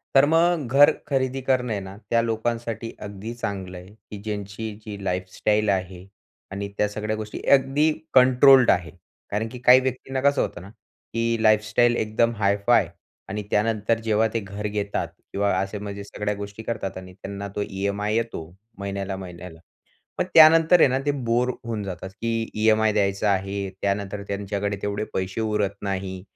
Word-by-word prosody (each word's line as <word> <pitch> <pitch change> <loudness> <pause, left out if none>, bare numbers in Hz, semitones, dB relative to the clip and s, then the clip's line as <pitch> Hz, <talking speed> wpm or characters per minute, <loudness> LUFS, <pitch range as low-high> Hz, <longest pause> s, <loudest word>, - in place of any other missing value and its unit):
तर 135 - +7
मग 165 -3 +3
घर 145 +3 +7 0.2
खरेदी 135 -1 -1
करणं 125 -2 0
आहे 100 - -2
ना, 95 +1 -9
त्या 115 0 +3
लोकांसाठी 115 0 -3
अगदी 105 +2 -7
चांगलं 95 -6 -5
आहे, 90 +1 -11 0.2
की 105 - -6
ज्यांची 105 +1 -5
जी 100 -2 -7
लाईफस्टाईल 95 +3 0
आहे. 95 -1 -2 0.5
आणि 100 +1 -4
त्या 105 - +2
सगळ्या 105 +1 -3
गोष्टी 110 -1 -6
अगदी 140 +3 +4 0.2
कंट्रोल्ड 130 0 +7
आहे. 85 -1 -1 0.4
कारण 105 +2 -1
की 125 - -8
काही 125 +1 +7
व्यक्तींना 130 +1 -3
कसं 140 +1 +3
होतं - - -4
ना, 95 - -11 0.4
की 115 0 0
लाईफस्टाईल 110 +3 +3
एकदम 115 +2 +1
हायफाय 100 -1 +3 0.4
आणि 105 +1 -3
त्यानंतर, 110 +1 +1
जेव्हा 110 0 +2
ते 115 - +1
घर 100 0 -5
घेतात 100 -4 -2 0.3
किंवा 100 0 +1
असे 95 +2 -3
म्हणजे 100 0 -6
सगळ्या 105 +1 -3
गोष्टी 100 +2 -8
करतात 110 -5 -4
आणि 95 0 -10
त्यांना 100 +1 -7
तो - - -1
ईएमआय 100 +2 -2
येतो, 115 -7 -2 0.3
महिन्याला-महिन्याला. 95 -4 -6 0.6
मग - - +2
त्यानंतर 165 +2 +7
आहे - - +7
ना, 130 +1 +1
ते - - +3 0.2
बोर 120 +2 +2
होऊन 115 -3 -3
जातात, 95 0 -6
की 115 +2 -3
ईएमआय 110 0 +3
द्यायचा 100 0 +1
आहे, 100 0 -1
त्यानंतर 100 0 -2
त्यांच्याकडे 100 0 -2
तेवढे 105 +1 -2
पैसे 95 +3 -2
उरत 105 -2 0
नाही 95 -2 -4
105 Hz, 160 wpm, -24 LUFS, 100-115 Hz, 0.6 s, तर